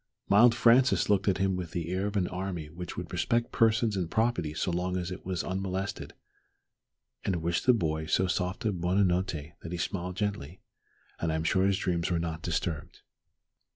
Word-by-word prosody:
The - - +4
mild 120 +3 +7
Francis 120 0 +4
looked 100 +1 +2
at 95 - +3
him 95 0 +1
with 90 -3 -5
the 85 -1 -3
air 95 +2 0
of 105 0 -2
an 90 -3 +1
army 90 -4 -4
which 90 +2 -7
would 90 0 -6
respect 115 +7 0
persons 110 -1 +3
and 90 -4 -2
property 110 -9 0
so 90 - -1
long 90 +1 -1
as 90 0 -3
it 90 - -8
was 90 -2 -1
unmolested, 95 +1 -3 1.1
and 95 - 0
wished 85 +4 -1
the 125 - +8
boy 80 -7 -1
so 95 - +2
soft 90 +5 -2
a 110 - +3
buona 90 +3 +1
notte 85 -4 -1
that 85 - -7
he 90 - -3
smiled 90 +1 -3
gently, 100 -5 -3 0.6
and 85 - 0
I - - 0
am 80 - -1
sure 95 +4 +2
his 100 -1 +2
dreams 85 -3 -1
were 85 - +1
not 85 -1 -3
disturbed. 80 -3 -3
90 Hz, 200 wpm, -29 LUFS, 85-100 Hz, 1.1 s, the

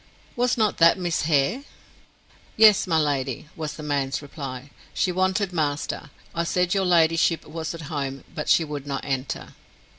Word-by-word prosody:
"Was 245 +1 +1
not 215 -3 +1
that 165 +2 +6
Miss 175 -2 -1
Hare?" 155 - +2 0.9
"Yes, 215 -2 +6
my 165 -2 +2
lady," 140 -2 -1
was 155 -2 -4
the 155 - -8
man's 140 -2 -1
reply. 140 -2 -8 0.2
"She 185 - +1
wanted 185 +1 0
master. 150 -2 -2 0.2
I 170 - 0
said 180 +2 +1
your 195 -1 +1
ladyship 165 -1 +3
was 160 +1 -5
at 165 - -8
home, 140 -3 -4
but 150 -3 -4
she 165 - +5
would 145 -2 -6
not 140 -1 -3
enter." 135 -1 -3
160 Hz, 160 wpm, -24 LUFS, 145-180 Hz, 0.9 s, that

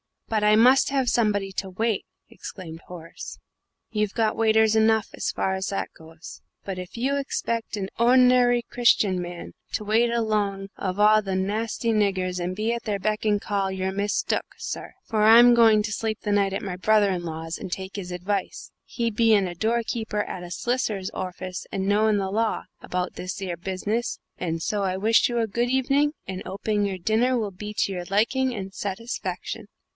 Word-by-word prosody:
"But 215 -2 0
I 210 0 +6
must 250 +5 +5
have 270 -3 +1
somebody 205 -4 +1
to 195 - -2
wait," 220 +3 -1 0.2
exclaimed 165 -4 -9
Horace. 170 -2 -9 0.5
"You've 210 -2 -1
got 220 -2 +1
waiters 220 -1 +4
enough, 220 -1 +3
as - - -2
far 190 - -1
as 190 +1 -2
that 195 - -2
goes. 160 +1 -12 0.2
But 190 -2 -5
if 180 -1 -8
you 270 +4 0
expect 230 -5 -2
a 195 -2 -3
hordinary 245 0 +5
Christian 210 -6 +3
man 175 0 -7 0.2
to 215 - -1
wait 225 +3 +2
along 210 -4 -1
of 185 -1 -3
a - - 0
lot 215 -1 +5
o' 190 - -1
narsty 215 +4 -1
niggers, 190 -4 0
and 180 +1 -3
be 220 +3 0
at 235 - -4
their 210 -2 -1
beck 215 +3 -2
and 205 -1 +2
call, 195 -2 -1
you're 190 0 -2
mistook, 200 +1 -1
sir, - - -6
for 220 -2 -1
I'm 235 +3 +8
going 225 -3 +5
to 210 - -3
sleep 220 0 -2
the 210 - -2
night 200 -1 +2
at - - -3
my 185 -3 -4
brother 210 +1 +3
in 180 -2 -2
law's 165 0 -5
and - - -6
take 190 +2 -5
his 180 -2 -6
advice, 190 +2 -3
he 235 -1 -2
bein' 215 -3 +3
a - - -6
doorkeeper 220 +1 -1
at 180 - -6
a 175 - -8
solicitor's 220 -1 -2
orfice 185 0 -6
and 190 0 -1
knowing 210 +1 +3
the 190 -1 -2
law, 225 +2 0 0.2
about 180 0 -3
this 180 +1 -5
'ere 180 -3 -3
business, 200 +7 -2 0.2
and 165 -2 -2
so 210 -1 -1
I 185 -1 -1
wish 220 +5 +3
you 240 -1 0
a 230 - +2
good 235 +4 -1
hevening, 275 +3 +2
and 190 0 -5
'oping 205 +1 -1
your 195 -2 -2
dinner 225 +7 +2
will 215 -3 -2
be 210 +3 -8
to - - +1
your 180 -2 -4
liking 240 +7 +1
and 195 -2 -6
satisfaction." 205 +5 -5
210 Hz, 190 wpm, -25 LUFS, 190-225 Hz, 0.5 s, I'm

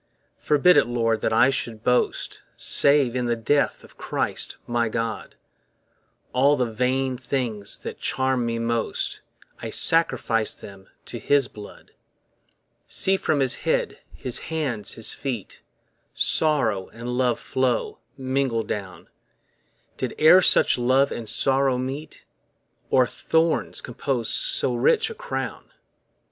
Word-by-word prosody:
Forbid 150 +3 +4
it, 145 - +4
Lord, 115 -2 0
that - - 0
I 120 +4 +4
should 115 -4 -4
boast 125 0 0 0.2
Save 140 -4 +3
in 125 -1 -1
the 120 - +1
death 140 +6 0
of - - -18
Christ - - -3
my 120 -1 0
God; 115 0 -4 1.0
All 140 +3 +4
the 125 - +1
vain 130 +2 -1
things 120 -6 -2
that - - -8
charm 130 -1 0
me 115 0 -2
most, 115 0 -2 0.4
I - - -5
sacrifice 115 -9 +1
them 95 -1 -13 0.2
to - - -7
his 140 -3 +2
blood. 105 -2 -13 1.0
See 190 - +2
from 150 -6 0
his 130 -1 +1
head, - - -1
his - - -1
hands, 140 -10 -3
his 115 - -3
feet, 125 -7 -6 0.5
Sorrow 115 -12 +1
and 120 +2 -6
love 125 -2 +1
flow, 130 -2 -1 0.2
mingled 130 -4 -1
down; 100 -3 -6 0.9
Did - - -4
e're 160 +4 +7
such 150 - +4
love 130 +3 +3
and 115 -2 -5
sorrow 135 +2 +1
meet? 135 +4 -6 0.6
Or 130 -1 +4
thorns 160 +6 0
compose 125 -1 -3
so 125 - +1
rich 440 - +2
a - - -5
crown? - - -5
125 Hz, 130 wpm, -24 LUFS, 115-140 Hz, 1.0 s, e're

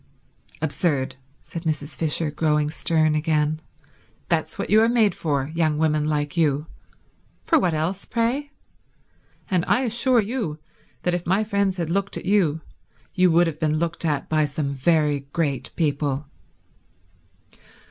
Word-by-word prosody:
"Absurd," 145 -4 0 0.3
said 170 - -7
Mrs. 155 -3 -3
Fisher, 155 0 0
growing 150 0 +1
stern 155 -1 +2
again. 155 0 0 0.7
"That's - - 0
what - - -4
you 215 +1 +6
are 225 - +4
made 225 -4 +3
for, 145 -2 -2
young 160 -2 +1
women 155 -1 +1
like 150 0 -1
you. 150 -3 +2 0.8
For 325 - +4
what 175 - +1
else, 175 +6 -2
pray? 250 +5 -1 1.0
And 180 -4 +1
I 255 - +2
assure 240 +1 +2
you 210 -8 -2 0.5
that 180 - +1
if 175 -1 -3
my 190 +4 +2
friends 200 -3 0
had 165 -2 -2
looked 200 +2 -1
at - - -7
you, 180 -6 +2 0.5
you 180 0 +4
would 170 +1 +4
have 160 -2 -4
been 155 -1 +1
looked 170 +1 -2
at 150 -4 -1
by 155 -1 +2
some 145 -1 -3
very 145 -1 +1
great 145 -6 -1
people." 145 -3 0
160 Hz, 145 wpm, -23 LUFS, 150-185 Hz, 1.0 s, you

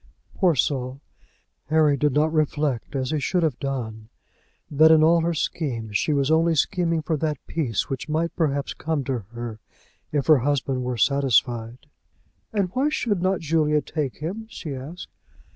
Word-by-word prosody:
Poor 180 -4 +2
soul! 130 0 -1 0.7
Harry 155 -2 +4
did 145 +2 +1
not 155 +3 +2
reflect 150 -4 -1
as 130 0 -1
he 155 - 0
should 175 +5 0
have 150 -7 0
done, 110 -5 -4 0.6
that 155 +2 +6
in 160 -1 +6
all 165 +1 +5
her 170 +1 0
schemes 120 -9 -3
she 155 - +1
was 140 0 +1
only 165 +1 +3
scheming 165 +1 +1
for 160 +1 0
that 150 -1 -1
peace 130 - -1
which 135 +2 -5
might 165 +2 -1
perhaps 145 -4 0
come 155 -3 -2
to 130 -1 -2
her 120 -2 -6 0.5
if 145 -2 0
her 155 -4 +6
husband 135 -1 0
were 125 -1 -3
satisfied. 120 -1 +1 0.7
"And 200 -4 0
why 275 +4 +2
should 220 - -1
not 185 0 +1
Julia 155 -1 +2
take 145 -3 -4
him?" 195 +9 -5
she 155 -9 -6
asked. 140 +7 -8
150 Hz, 165 wpm, -24 LUFS, 130-160 Hz, 0.7 s, that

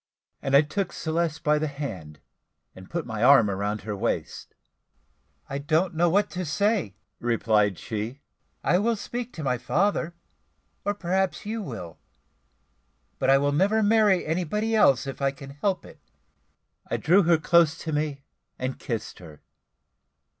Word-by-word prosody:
And 135 0 +1
I 140 - +7
took 170 +5 -3
Celeste 160 -1 -2
by 150 0 +3
the 155 - -1
hand, 95 - -7 0.6
and 95 0 -13
put 170 -2 -3
my 110 -2 -5
arm 125 -5 +6
round 100 +2 -2
her 105 +1 -4
waist. 95 - -3 0.9
"I 140 - -4
don't 160 +5 +1
know 170 +2 +2
what 200 +5 +3
to 180 +1 -3
say," 175 - 0 0.2
replied 110 -4 +1
she, 110 +5 -5 0.4
"I 175 +6 +3
will 230 +3 +1
speak 240 +3 -5
to 160 - -6
my 125 -3 0
father, 170 - 0 0.7
or 205 0 -1
perhaps 190 0 -1
you 220 +2 -3
will; 115 - -7 1.2
but - - +1
I 135 - +7
will 145 +1 +1
never 200 +9 +2
marry 210 -3 +4
anybody 185 +7 -1
else 135 - +4
if 135 0 -6
I 135 - +3
can 135 0 -10
help 185 +7 -2
it." - - -14 0.9
I - - 0
drew 180 +6 +4
her 170 -2 +4
close 165 0 +3
to 160 - -3
me, 150 -2 -2 0.3
and 130 +1 -4
kissed 115 -6 -5
her. 80 -5 -13
150 Hz, 155 wpm, -26 LUFS, 125-185 Hz, 1.2 s, I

